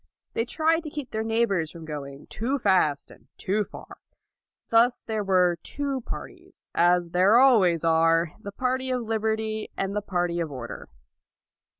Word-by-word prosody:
They 230 - 0
tried 320 +5 +1
to - - -4
keep 290 -4 -7
their 220 - -2
neighbors 225 -7 +1
from 165 -1 -10
going 140 -2 -7
too 255 +6 -2
fast 185 - +1
and - - -18
too 210 +3 0
far. - - -12 0.7
Thus 235 +2 +3
there 220 -2 -2
were 180 -3 +2
two 280 -2 -3
parties, - - -9
as 175 0 +3
there 185 +6 +5
always 195 - +4
are, 165 0 +3
the 205 -2 -8
party 260 +4 -1
of 250 -1 -1
liberty 220 -1 -2
and 195 0 -1
the 205 - -3
LAUD - - 0
215 - - -23
party 175 -2 0
of 165 -3 -3
order. 125 -3 -7
200 Hz, 170 wpm, -26 LUFS, 170-235 Hz, 0.7 s, there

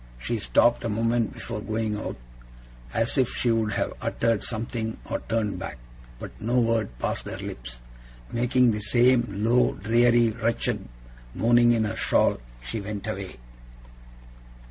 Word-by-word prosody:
She 115 - -3
stopped 120 +3 +3
a 115 - -1
moment 115 +1 +1
before 110 -3 -5
going 110 0 -2
out, 105 - -5 0.7
as 115 - +1
if 130 - +3
she 120 - 0
would 110 -2 +1
have - - -1
uttered 115 -3 0
something 110 0 -3
or - - -2
turned 110 -3 -2
back; - - -6 0.4
but - - -8
no 120 +3 +2
word 115 - 0
passed - - -3
her - - -5
lips. - - -7 0.5
Making 125 +1 +3
the 105 - -2
same 120 +3 +3
low, 115 +5 +2
dreary, 120 +2 +3
wretched 115 - -1 0.5
moaning 120 +1 +5
in 115 -2 +2
her 110 +1 -2
shawl, - - +2 0.3
she 110 - -3
went 100 0 -5
away. 100 -3 -5
115 Hz, 145 wpm, -26 LUFS, 105-120 Hz, 0.7 s, moaning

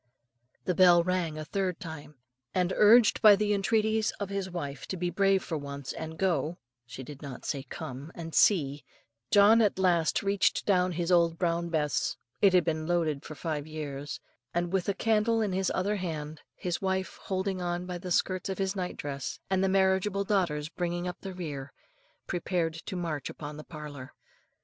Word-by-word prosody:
The 180 - +1
bell 175 -1 +6
rang 175 -3 -1
a 155 - -5
third 185 0 -2
time; 160 -3 -8 0.4
and, 180 0 +1
urged 220 +2 +6
by 210 -2 +9
the 210 +1 +1
entreaties 220 +2 +2
of 200 -2 -3
his 195 -1 -3
wife 145 -6 -5
to 190 - -4
be 175 0 -1
brave 195 +1 +3
for 160 -3 -3
once 140 -1 -6
and 160 0 -6
go 170 -3 0 0.3
she 130 +2 -8
did 145 +1 -10
not 140 -4 -8
say 140 - -2
come 145 +1 -7
and 165 -1 -7
see, 145 -8 +3 0.5
John 210 +3 +6
at 210 -4 +2
last 175 -3 +2
reached 200 -1 +1
down 180 -2 +2
his 170 +1 -1
old 170 -2 +4
brown 170 -1 0
Bess 150 -3 0 0.2
it 195 -2 +6
had 180 -2 +4
been 155 -1 -1
loaded 160 -5 0
for 155 - -8
five 155 -2 -3
years 145 -2 -5 0.4
and 175 +1 -1
with 190 0 +1
a 200 - 0
candle 225 +2 +2
in 210 -3 0
his 190 0 0
other 200 +3 0
hand, 155 -4 -5
his 175 -1 -3
wife 190 -1 -2
holding 190 -1 -2
on 175 0 -2
by 180 -1 -5
the 180 +1 -6
skirts 185 +2 0
of 190 - -3
his 195 0 -1
night 180 -2 -3
dress, 140 -2 -4
and 190 0 +2
the 190 - +2
marriageable 190 +1 +2
daughters 175 -7 0
bringing 175 +1 -3
up 180 - -6
the 190 -2 -6
rear, 145 -6 -6 0.5
prepared 175 -2 -1
to 165 +3 -7
march 165 -6 -3
upon 150 -1 -7
the 155 - -8
parlour. 150 -5 -9
175 Hz, 190 wpm, -29 LUFS, 155-190 Hz, 0.5 s, by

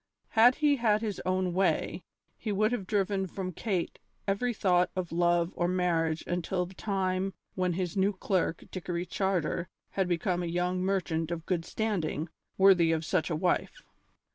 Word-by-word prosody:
Had 240 +3 +6
he 295 -2 +3
had 215 -3 +2
his 215 -3 -3
own 185 -1 +1
way, 190 +2 +1 0.3
he 215 - -4
would 215 +3 +2
have 215 -7 -2
driven 195 -2 0
from 185 0 -4
Kate 185 -1 -2 0.3
every 200 +5 +1
thought 180 -5 +2
of 185 -2 -3
love 175 0 +2
or 175 - +1
marriage 170 -3 +1
until 180 +1 -1
the 180 - -12
time 190 -1 -1 0.2
when 185 -1 0
his 180 -1 -2
new 195 +1 +3
clerk, 185 -3 -1
Dickory 175 -1 -3
Charter, 180 -3 -1 0.2
had 190 -2 0
become 175 +1 0
a 175 - -2
young 180 +2 0
merchant 170 -4 0
of 170 -1 -4
good 170 -3 -1
standing, 175 -8 -2 0.3
worthy 185 -4 +6
of 160 -1 0
such 180 0 0
a 165 - 0
wife. 185 - -1
185 Hz, 165 wpm, -29 LUFS, 175-195 Hz, 0.3 s, Had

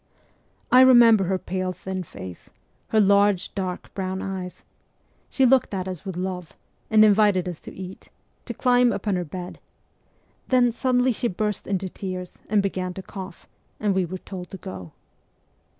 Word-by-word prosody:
I 255 - +8
remember 235 -6 +7
her 190 +1 0
pale 185 0 -3
thin 190 0 -5
face, 95 - -10 0.4
her 220 - +2
large, 200 -2 +3
dark 185 -2 -5
brown 190 -1 -3
eyes. 190 -2 -6 0.7
She 265 - +2
looked 255 -4 +3
at 185 -1 -3
us 185 -1 -6
with 190 -3 -5
love, 180 -2 -4 0.4
and 215 -1 +6
invited 205 -3 +4
us 175 -3 -5
to - - -11
eat, 185 0 -10 0.4
to - - -5
climb 245 -1 +3
upon 205 -1 -1
her 180 - -1
bed; 175 +2 -8 0.9
then 250 -2 +4
suddenly 250 +1 +2
she 240 +1 -1
burst 210 0 -2
into 190 -1 -1
tears 185 -1 -6
and 205 -1 +3
began 185 -2 -3
to 190 - -7
cough, 190 -2 -9 0.3
and 210 -2 +1
we 190 0 +1
were 185 +2 -6
told 180 -1 -9
to 190 - -8
go. 95 - -8
190 Hz, 165 wpm, -24 LUFS, 185-215 Hz, 0.9 s, I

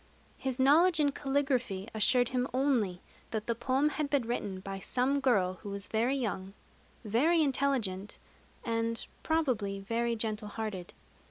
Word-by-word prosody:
His 265 -1 -3
knowledge 320 +6 +5
in 290 -1 +3
caligraphy 270 -8 -1
assured 245 +3 +3
him 250 0 0
only 240 -10 +1 0.3
that 220 -1 -3
the 235 - 0
poem 260 +5 +1
had 300 -1 -2
been 280 -3 +2
written 205 -5 -3
by 195 0 -6
some 255 +8 +1
girl 190 -9 +2
who 205 - -7
was 200 0 -5
very 235 +5 +1
young, 200 -6 -3 0.5
very 305 +10 +3
intelligent, 255 -9 0 0.5
and 230 0 0 0.2
probably 245 -12 0
very 230 +4 -1
gentle 215 -1 -2
hearted. 210 -4 -5
235 Hz, 145 wpm, -31 LUFS, 205-275 Hz, 0.5 s, knowledge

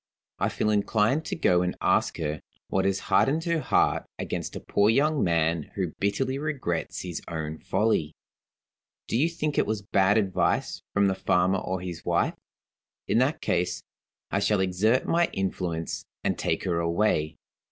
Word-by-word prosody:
I - - +1
feel 105 - 0
inclined 110 +8 +2
to - - -3
go 90 - +3
and 90 0 -2
ask - - +2
her 75 -1 -3 0.3
what 95 - +1
has 95 0 +1
hardened 155 +4 +2
her 170 -1 0
heart - - +1
against - - -4
a - - -4
poor 100 +1 +2
young 145 +5 +3
man 80 -2 +1
who 90 -5 -2
bitterly 130 +7 0
regrets 135 - -3
his 90 -3 -5
own 80 -1 -4
folly. 80 -9 0 0.9
Do - - -2
you 150 +8 +3
think 155 -3 -1
it - - +1
was 105 -2 -2
bad 100 0 +3
advice 100 -4 0
from 100 0 +4
the 95 - +3
farmer 95 0 +2
or 95 0 -3
his 90 -2 -6
wife? - - +1 0.7
In 115 - +3
that 140 +6 +1
case, 90 0 -1 0.5
I 100 - +1
shall 100 0 +2
exert 100 +7 +2
my 170 +1 +2
influence, 90 -4 -2 0.2
and - - +1
take - - -1
her 85 -3 0
away. 85 -2 +1
95 Hz, 165 wpm, -27 LUFS, 85-115 Hz, 0.9 s, from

